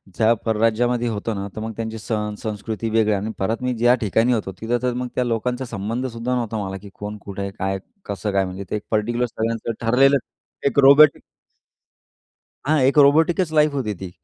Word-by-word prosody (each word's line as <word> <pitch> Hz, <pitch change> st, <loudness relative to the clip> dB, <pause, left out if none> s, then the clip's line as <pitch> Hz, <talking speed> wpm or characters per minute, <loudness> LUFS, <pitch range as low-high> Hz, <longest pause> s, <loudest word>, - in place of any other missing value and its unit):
ज्या 115 Hz, +1 st, +4 dB
परराज्यामध्ये 115 Hz, +2 st, +1 dB
होतो 110 Hz, 0 st, -2 dB
ना 100 Hz, 0 st, -4 dB
तर -, -, -5 dB
मग 110 Hz, 0 st, -4 dB
त्यांचे 110 Hz, 0 st, -4 dB
सण 105 Hz, -1 st, -3 dB
संस्कृती 110 Hz, +1 st, -4 dB
वेगळी 110 Hz, -1 st, +2 dB
आणि 105 Hz, +2 st, -2 dB
परत 110 Hz, +5 st, -1 dB
मी 125 Hz, 0 st, 0 dB
ज्या 120 Hz, +2 st, +4 dB
ठिकाणी 115 Hz, +3 st, +2 dB
होतो, 105 Hz, -4 st, -2 dB
तिथं 120 Hz, +2 st, 0 dB
तर 125 Hz, -, +1 dB
मग 125 Hz, +1 st, -3 dB
त्या 125 Hz, -, +1 dB
लोकांचा 125 Hz, +2 st, -2 dB
संबंध 115 Hz, +2 st, -3 dB
सुद्धा 120 Hz, +1 st, -3 dB
नव्हता 115 Hz, -2 st, -2 dB
मला 95 Hz, 0 st, -5 dB
की 100 Hz, -, -11 dB
कोण, 105 Hz, +1 st, -7 dB
कुठे 100 Hz, 0 st, -7 dB
आहे, 100 Hz, 0 st, -3 dB
काय, 95 Hz, 0 st, -3 dB, 0.3 s
कसं 100 Hz, +1 st, -3 dB
काय? 95 Hz, -1 st, +2 dB
म्हणजे 95 Hz, +2 st, -6 dB
ते -, -, -2 dB
एक 105 Hz, -, -4 dB
पार्टिक्युलर 120 Hz, +3 st, +1 dB
सगळ्यांचं 115 Hz, 0 st, -3 dB
ठरलेलं 135 Hz, +4 st, +5 dB, 0.5 s
एक 140 Hz, 0 st, +1 dB
रोबोटिक 140 Hz, +2 st, +7 dB, 1.4 s
हां, 155 Hz, +2 st, +3 dB
एक 135 Hz, +3 st, +3 dB
रोबोटिकच 160 Hz, +4 st, +4 dB
लाईफ 150 Hz, -1 st, +4 dB
होती 125 Hz, -7 st, -2 dB
ती 95 Hz, -2 st, -6 dB
115 Hz, 195 wpm, -22 LUFS, 105-125 Hz, 1.4 s, रोबोटिक